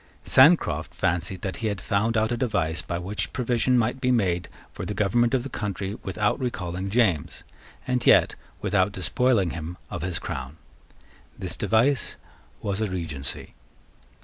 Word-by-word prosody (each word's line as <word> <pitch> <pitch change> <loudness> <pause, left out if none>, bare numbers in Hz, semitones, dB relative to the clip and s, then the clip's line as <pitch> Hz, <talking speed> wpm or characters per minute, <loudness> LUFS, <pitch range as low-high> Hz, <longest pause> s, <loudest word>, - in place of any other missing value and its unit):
Sancroft - - +4
fancied 90 +2 -1
that 95 - -3
he 115 - -2
had 100 -2 -2
found 110 +4 0
out 110 +1 +1
a - - +1
device 105 -10 0
by 85 - -4
which 95 +4 -3
provision 125 0 +1
might 120 +3 0
be 125 - +1
made 95 -8 +1 0.2
for - - -6
the 105 - -4
government 120 +4 +2
of 125 - 0
the - - -4
country 100 -5 -4
without 105 +4 0
recalling 95 -7 -3
James, 100 - +1 0.4
and 125 -1 0
yet - - +6 0.3
without 100 -1 +1
despoiling 95 +1 +1
him 85 +2 -6
of - - -4
his 90 -2 -2
crown. 65 +3 -5 0.8
This - - -4
device 120 +4 +1 0.5
was 100 +1 -1
a 110 - 0
Regency. 80 -7 -4
100 Hz, 155 wpm, -25 LUFS, 90-120 Hz, 0.8 s, yet